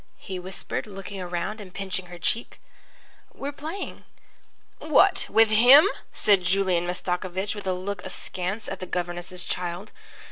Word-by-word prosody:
he 185 -1 -6
whispered, 185 +4 -5
looking 195 -1 -7
around 180 +4 -3
and 185 -3 -12
pinching 190 -2 -2
her 175 0 -9
cheek. 225 +7 -2 0.8
"We're 280 +1 -4
playing." 315 +7 -6 0.8
"What, - - +4
with 225 0 +5
him?" 255 - +8 0.2
said 200 -3 +4
Julian 180 -1 +1
Mastakovich 180 +2 -2
with 205 -2 -7
a 185 - +2
look 185 +1 -4
askance 195 +4 -4
at 195 - -5
the 185 - -6
governess's 175 +1 -3
child. 180 +3 -4
190 Hz, 140 wpm, -26 LUFS, 180-210 Hz, 0.8 s, him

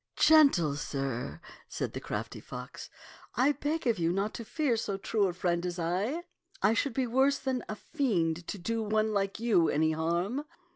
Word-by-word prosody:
" - - -56
Gentle 275 - +5
sir," 135 - -3 0.3
said - - -3
the - - -4
crafty - - -5
fox, - - -8 0.2
" - - -17 0.2
I 255 +5 +4
beg 295 +2 -2
of 230 -6 +2
you 165 0 +2
not 200 +4 -1
to 235 - -6
fear 275 +1 0
so 205 -3 -2
true 205 0 +1
a 180 - -2
friend 175 -1 0
as 180 0 -3
I. 190 - -1 0.4
I 210 +3 +4
should 235 +1 0
be 265 - +1
worse 265 +4 +3
than 260 -3 -2
a 215 - -3
fiend 180 - -1
to - - -4
do 225 +5 -2
one 215 0 +1
like 200 0 -1
you 205 -8 +3
any 155 +1 +2
harm. 170 - -1
210 Hz, 195 wpm, -30 LUFS, 170-255 Hz, 0.4 s, Gentle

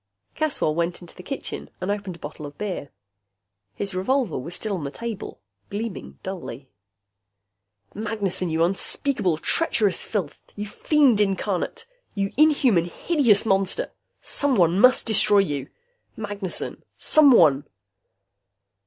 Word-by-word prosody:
Caswell 300 - 0
went 170 +2 -2
into 175 - -12
the - - -10
kitchen 275 +9 -6
and 185 +2 -2
opened 205 -3 -4
a - - -13
bottle 155 -2 -8
of 145 - -13
beer. 190 -8 -4 0.9
His 200 -1 -3
revolver 225 - 0
was 170 +7 -5
still 215 +1 -1
on 180 -6 -3
the 140 - -3
table, 225 - -6 0.3
gleaming 210 0 -5
dully. 145 -9 -7 1.2
Magnessen! 205 -4 -1
You 160 +1 +1
unspeakable 190 - 0
treacherous 210 - +1
filth! 190 -9 -3 0.2
You 210 - -4
fiend 260 0 +3
incarnate! 195 - -1 0.3
You 195 -1 -1
inhuman, 275 - +4
hideous 235 - +2
monster! 195 -2 +1 0.3
Someone 190 - +2
must 255 +3 +5
destroy 215 -2 +4
you, 145 -9 0 0.5
Magnessen! 205 -3 -5
Someone.... 170 - +5
200 Hz, 120 wpm, -24 LUFS, 175-225 Hz, 1.2 s, must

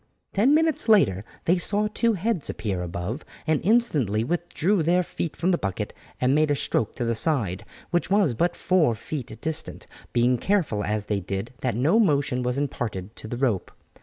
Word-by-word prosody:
Ten 245 +9 +4
minutes 320 -6 +1
later 100 - +4 0.2
they 175 +2 +3
saw 205 +4 +1
two 230 +2 +1
heads 195 -3 -1
appear 100 -4 -3
above, 90 - -4 0.2
and 155 -2 +1
instantly 150 - +2
withdrew 175 - 0
their 175 +3 +3
feet 165 -2 -4
from 180 +3 +1
the 175 - +1
bucket 95 -2 -3 0.3
and 130 +1 +3
made 155 +1 +3
a 145 - +3
stroke 115 -5 -1
to 120 - -2
the 115 - +1
side, 110 - 0 0.3
which 175 +1 +1
was 195 - +3
but 170 +9 0
four 170 -10 +2
feet 125 +3 -6
distant, 160 -1 -4 0.3
being 120 0 +2
careful 170 - +1
as 105 0 -2
they 105 -1 -1
did 100 +5 -4
that 125 -4 0
no 150 - +3
motion 140 - +2
was 125 +1 -1
imparted 115 -7 -3
to - - -9
the 120 - -4
rope. 120 -7 0
140 Hz, 185 wpm, -25 LUFS, 110-180 Hz, 0.3 s, Ten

